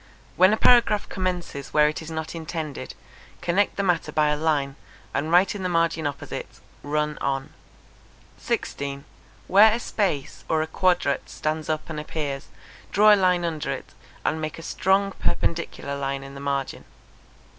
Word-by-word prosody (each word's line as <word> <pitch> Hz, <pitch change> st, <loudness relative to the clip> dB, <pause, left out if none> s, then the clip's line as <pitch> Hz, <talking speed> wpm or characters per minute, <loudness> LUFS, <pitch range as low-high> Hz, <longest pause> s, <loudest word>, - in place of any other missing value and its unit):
When 185 Hz, +2 st, +6 dB
a 215 Hz, -, +2 dB
paragraph 230 Hz, -4 st, +5 dB
commences 180 Hz, -7 st, -3 dB
where 150 Hz, 0 st, +6 dB
it 155 Hz, -, -2 dB
is 160 Hz, -, -8 dB
not 160 Hz, -1 st, -4 dB
intended, 160 Hz, -3 st, -5 dB, 0.4 s
connect 190 Hz, +4 st, +1 dB
the 200 Hz, -, -1 dB
matter 180 Hz, -4 st, +1 dB
by 150 Hz, -1 st, +3 dB
a 150 Hz, -, +2 dB
line, 145 Hz, -3 st, 0 dB, 0.4 s
and 155 Hz, +3 st, -1 dB
write 180 Hz, +3 st, +5 dB
in 205 Hz, -, -6 dB
the 185 Hz, -, -1 dB
margin 165 Hz, -2 st, +1 dB
opposite 145 Hz, -, -5 dB, 0.3 s
run 150 Hz, +1 st, -1 dB
on. 135 Hz, -1 st, -2 dB, 0.9 s
16. 140 Hz, 0 st, -3 dB, 0.4 s
Where 210 Hz, +3 st, +7 dB
a 230 Hz, -, 0 dB
space 190 Hz, -, -2 dB
or 160 Hz, -1 st, +2 dB
a -, -, -5 dB
quadrat 175 Hz, -5 st, +1 dB
stands 155 Hz, 0 st, -3 dB
up 155 Hz, -1 st, -1 dB
and 155 Hz, -2 st, -5 dB
appears, 145 Hz, -2 st, -4 dB, 0.4 s
draw 210 Hz, +2 st, +7 dB
a -, -, +8 dB
line 180 Hz, -3 st, +2 dB
under 160 Hz, -3 st, -3 dB
it, -, -, -6 dB, 0.3 s
and 160 Hz, +1 st, 0 dB
make 155 Hz, -1 st, -4 dB
a 165 Hz, -, -9 dB
strong 195 Hz, +3 st, +1 dB
perpendicular 165 Hz, -6 st, -2 dB
line 135 Hz, 0 st, -3 dB
in 135 Hz, 0 st, -10 dB
the 140 Hz, -, -8 dB
margin. 140 Hz, -1 st, -2 dB
160 Hz, 165 wpm, -25 LUFS, 145-185 Hz, 0.9 s, a